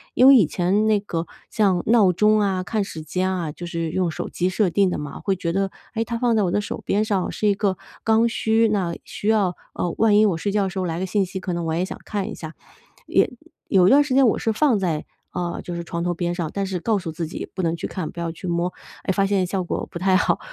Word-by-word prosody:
因 255 - +6
为 275 - +10
以 210 - +6
前 190 +6 +1
那 215 -1 +3
个 170 -4 -4 0.2
像 190 -5 +2
闹 220 -5 +5
钟 215 +4 +3
啊， 190 -2 0
看 215 +3 -1
时 160 -5 -7
间 185 +4 -1
啊， 175 -5 -2
就 175 - -8
是 165 -1 -3
用 180 +1 0
手 160 - -4
机 180 +1 0
设 185 +1 +1
定 195 +1 +3
的 - - -2
嘛， 145 -1 -6
会 195 - 0
觉 170 -2 -2
得， 195 +1 0 0.2
哎， 225 - 0
它 235 0 -3
放 240 -1 +2
在 215 - +3
我 180 - 0
的 - - +2
手 210 - -5
边 210 +2 +1
上 200 -4 0
是 210 - -1
一 205 - +4
个 195 -2 0 0.3
刚 225 +1 +4
需， 225 0 +2
那 195 -5 0
需 205 - -6
要 200 -5 +2 0.2
呃， 175 - -2
万 215 -2 +4
一 215 - +6
我 190 -6 +1
睡 200 +5 -2
觉 205 0 +2
的 190 - -1
时 185 - -8
候 - - -1
来 165 -1 -2
个 190 - -1
信 195 +1 +1
息， 190 +1 -6
可 185 -1 -3
能 170 0 -2
我 160 - -1
也 175 +3 0
想 - - -7
看 205 -1 -3
一 - - -6
下， 160 -1 -8 0.5
也 - - +3 0.4
有 185 -2 +5
一 - - +6
段 285 +5 +6
时 285 -3 -3
间 265 -1 +6
我 220 - +2
是 225 - 0
放 255 -1 +3
在， 165 -5 -1 0.3
呃， 175 -1 -3
就 175 - -5
是 170 - -4
床 170 0 -4
头 175 0 0
边 175 0 -2
上， 170 -3 -2
但 200 -1 -1
是 190 -2 -3
告诉 195 -4 -1
自 165 +1 -4
己 - - -6
不 185 - -2
能 165 0 +1
去 165 - -4
看， 180 -5 -5
不 - - -9
要 170 -1 -2
去 175 +3 -8
摸， 170 +1 0 0.3
哎， - - 0
发 195 +1 +2
现 195 -2 +1
效 190 0 -1
果 175 - -3
不 - - -5
太 190 +1 +3
好， 185 - +2
190 Hz, 300 characters per minute, -23 LUFS, 175-210 Hz, 0.5 s, 为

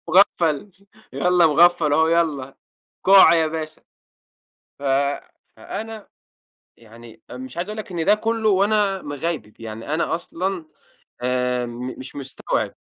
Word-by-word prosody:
مُغفل 175 -1 +3 0.4
يالّا 180 -1 +3
مُغفل 165 -1 +4
هو 160 +2 +4
يالّا 155 -6 0 0.5
كُع 195 -3 +8
يا 165 -1 +3
باشا. 155 0 -6 1.0
ف - - -15 0.7
فأنا 220 -1 -7 0.7
يعني 115 0 -15
مش 130 +3 -9
عايز 175 +4 -3
أقول 215 +1 -6
لك 215 - -7
إن 165 -2 -2
ده 210 - +5
كلّه 225 0 -1
وأنا 200 0 +2
مِغيبب، 145 -7 -5
يعني 115 +6 -5
أنا 165 - 0
أصلًا 175 +1 -4 0.6
آآ، 125 -1 0 0.3
مش 130 +2 -10
مستوعب. 135 -1 -3
165 Hz, 120 wpm, -22 LUFS, 130-190 Hz, 1.0 s, كُع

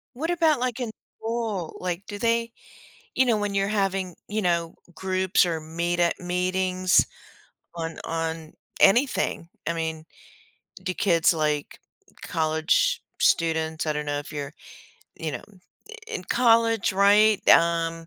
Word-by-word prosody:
What 320 +7 -2
about, 325 -5 +2
like, 250 -1 -2
in 240 -3 -3 0.3
school, 225 -6 -3
like, 180 +2 -4
do 205 - -6
they 230 +1 0 0.6
you 260 - +4
know, 235 -3 +3
when 205 -1 -2
you're 195 0 +1
having, 195 -3 -1
you 215 +2 -1
know, 170 -3 0 0.2
groups 190 0 +1
or 165 -2 -2
meet 170 +2 -2
at 170 -1 +1
meetings 185 +1 +1 0.7
on 165 -1 -5
on 165 -1 -4 0.3
anything, 195 -6 +3 0.2
I 170 - +1
mean, 160 -1 -4 0.8
do 185 0 -2
kids, 170 -3 +3
like, 150 -2 -2 0.4
college 160 - +1 0.2
students 160 -1 +1
I 155 - 0
don't 150 0 -3
know 145 0 -1
if 145 - -10
you're, 145 0 -5 0.6
you 160 -2 -4
know, - - -6 0.4
i 450 - -10
in 455 -2 -5
college, 230 -3 +3
right? 205 +2 +4
Um, 165 0 +3
185 Hz, 140 wpm, -25 LUFS, 165-215 Hz, 0.8 s, you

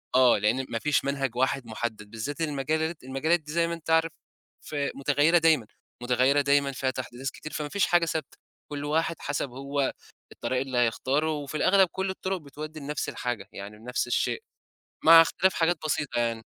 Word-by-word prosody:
آه، 125 -3 +6
لإن 115 +6 +1
ما 115 - -2
فيش 145 0 +1
منهج 135 -3 -1
واحد 130 0 0
محدّد 110 -2 -5
بالذات 135 +8 -5
المجالات 155 +1 -1
المجالات 140 +6 +1
دي 150 -1 -10
زي 170 +1 +2
ما 170 - -3
أنت 165 -1 -8
عارف 160 0 +3 0.5
ف - - -8 0.2
متغيّرة 145 +4 +3
دايمًا، 160 -9 +3 0.4
متغيّرة 130 +3 +3
دايمًا 140 0 +2
فيها 130 0 -1
تحديثات 130 +1 -5
كتير 155 - -9
فما 150 -1 -3
فيش 200 +1 +2
حاجة 175 -1 +3
ثابتة، 160 -3 -4 0.3
كلّ 145 0 -4
واحد 165 +2 0
حسب 140 -1 -2
هو 140 +2 -2 0.4
الطريق 125 +2 -2
اللي 130 -2 -3
هيختاره 135 +6 +1
وفي 150 0 -4
الأغلب 190 +3 +5
كلّ 190 0 -2
الطُرُق 190 0 -2
بتودّي 155 0 -8
لنفْس 145 +1 -3
الحاجة 120 -2 -4
يعني 100 +2 -9
بنفْس 125 +3 -2
الشيء، 445 - 0 0.6
مع 165 0 +10
اختلاف 190 +3 +2
حاجات 165 +1 +2
بسيطة 150 -4 -1
يعني. 115 -1 -1
145 Hz, 175 wpm, -27 LUFS, 130-160 Hz, 0.6 s, مع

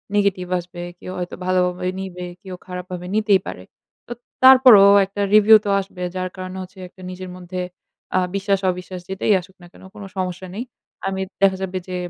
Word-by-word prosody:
Negative 200 -3 +1
আসবে। 175 0 -9 0.2
কেউ 185 - -8
হয়তো 180 0 -5
ভালোভাবে 180 0 0
নিবে, 180 -2 -6 0.2
কেউ 190 -3 -8
খারাপভাবে 180 -1 -6
নিতেই 210 -3 +3
পারে। - - -7 0.4
তো - - -12 0.3
তারপরেও 255 -7 +9
একটা 195 +1 -6
রিভিউ 215 +1 +8
তো - - -1
আসবে 190 -1 -11
যার 185 0 -2
কারণে 185 0 -7
হচ্ছে 185 +2 -15
একটা 185 - -18
নিজের 185 0 -8
মধ্যে 180 0 -6 0.6
আ - - +5 0.2
বিশ্বাস 200 0 +1
অবিশ্বাস 180 0 -7
যেটাই 195 +2 +1
আসুক 185 +2 -18
না 175 - -13
কেন - - -17
কোন 205 - -10
সমস্যা 185 0 -3
নেই। 230 - -3 0.4
আমি 190 0 -2 0.2
দেখা 195 -1 +4
যাবে 190 0 -3
যে 185 - -5
185 Hz, 180 wpm, -21 LUFS, 180-200 Hz, 0.6 s, তারপরেও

